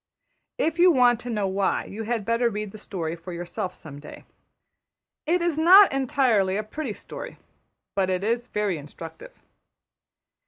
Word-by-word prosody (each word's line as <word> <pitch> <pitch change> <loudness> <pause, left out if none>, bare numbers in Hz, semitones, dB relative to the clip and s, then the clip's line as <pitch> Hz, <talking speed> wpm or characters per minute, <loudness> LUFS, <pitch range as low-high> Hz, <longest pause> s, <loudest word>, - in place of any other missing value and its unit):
If 325 +2 -1
you 360 +1 +7
want 245 -6 +4
to 245 - -7
know 210 -4 -1
why, 195 +1 0
you 215 - -7
had 225 -2 -2
better 230 +1 +2
read 210 -2 -5
the 215 - -11
story 170 -6 -4
for 170 +2 -10
yourself 175 +1 -5
some 145 -2 -11
day. 150 - -12 1.0
It 345 +2 +2
is 335 -3 0
not 375 +5 +8
entirely 255 -8 +2
a 215 - -2
pretty 240 +2 -5
story, - - -9 0.6
but 190 -2 +1
it 185 0 -1
is 235 +3 -1
very 205 -8 -1
instructive. 160 - -11
215 Hz, 160 wpm, -25 LUFS, 190-265 Hz, 1.0 s, not